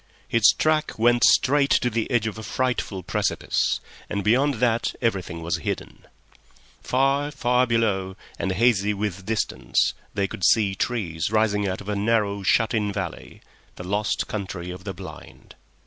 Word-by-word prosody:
His 110 -4 +5
track 155 +7 0
went 120 +2 +3
straight 140 +1 +4
to 125 - +2
the 115 0 -1
edge 120 -4 +1
of 110 0 -4
a - - -6
frightful 110 -4 -2
precipice, - - 0 0.3
and 100 - -2
beyond 130 +7 +3
that 115 0 0
everything 95 -8 -2
was 85 +2 -1
hidden. 80 - -5 0.7
Far, 135 +3 +1
far 125 -3 +1
below, 100 -5 0 0.2
and 95 - -1
hazy 105 -2 +2
with 95 -2 -4
distance, 110 -2 0 0.2
they 100 -1 +1
could 95 - -8
see 100 +2 +4
trees 90 -7 -2
rising 105 -2 +1
out 95 0 -3
of 100 - -12
a 105 - -1
narrow, 100 -1 +1
shut 105 +4 +2
in 105 -2 0
valley—the 95 -2 -8
lost 100 +3 -1
Country 95 -4 -5
of 90 0 -10
the 95 - -4
Blind. 95 +1 -11
105 Hz, 155 wpm, -24 LUFS, 95-120 Hz, 0.7 s, His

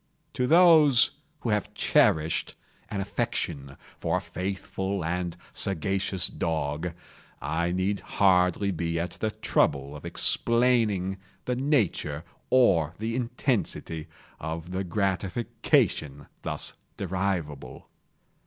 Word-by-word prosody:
To 125 - 0
those 160 -6 +6 0.3
who 120 - -2
have 105 -1 -1
cherished 80 +1 +2 0.3
an 100 - -2
affection 70 -8 -3 0.2
for - - 0
a - - -3
faithful 95 0 -3
and 90 0 -2 0.2
sagacious 95 0 0
dog, 80 +1 -2 0.5
I 85 +3 -1
need 95 +2 0
hardly 95 0 +2
be 85 -1 -2
at 85 0 -2
the 110 - -2
trouble 70 -8 0
of 75 - -10
explaining 115 -6 +2 0.3
the 125 - 0
nature 110 - 0 0.3
or 85 - +4
the 115 +2 -3
intensity 120 - -2 0.3
of 80 +2 -5
the 95 +1 -2
gratification 90 - 0 0.2
thus - - -1 0.2
derivable. 90 -6 -3
95 Hz, 105 wpm, -27 LUFS, 80-110 Hz, 0.5 s, those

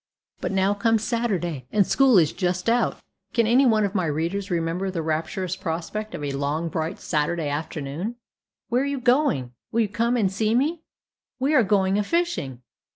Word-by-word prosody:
But - - -2
now 195 +1 +2
comes 225 +1 +1
Saturday, 185 - -1
and 205 -2 +3
school 265 -1 +4
is 160 -4 +4
just 180 +1 -1
out. 240 +1 +2 0.4
Can 230 - +4
any 250 +4 +5
one 215 -3 +3
of 200 - -3
my 185 -5 0
readers 170 +7 -2
remember 170 +2 -1
the 170 -4 -3
rapturous 165 +3 -2
prospect 190 +5 -4
of 150 - -6
a 145 - -2
long, 145 +4 -1
bright 165 +1 -3
Saturday 155 0 -1
afternoon? 150 +7 -4 0.5
"Where 245 +2 +2
are - - 0
you 280 -1 -2
going?" 245 - +2 0.2
"Will 230 - +2
you 220 - +2
come 230 +4 +1
and 200 -5 +2
see 215 +3 +1
me?" 305 +6 +1 0.6
"We 275 +4 +1
are 280 - +6
going 195 -1 +2
a - - +1
fishing!" 200 - -1
195 Hz, 185 wpm, -24 LUFS, 165-230 Hz, 0.6 s, are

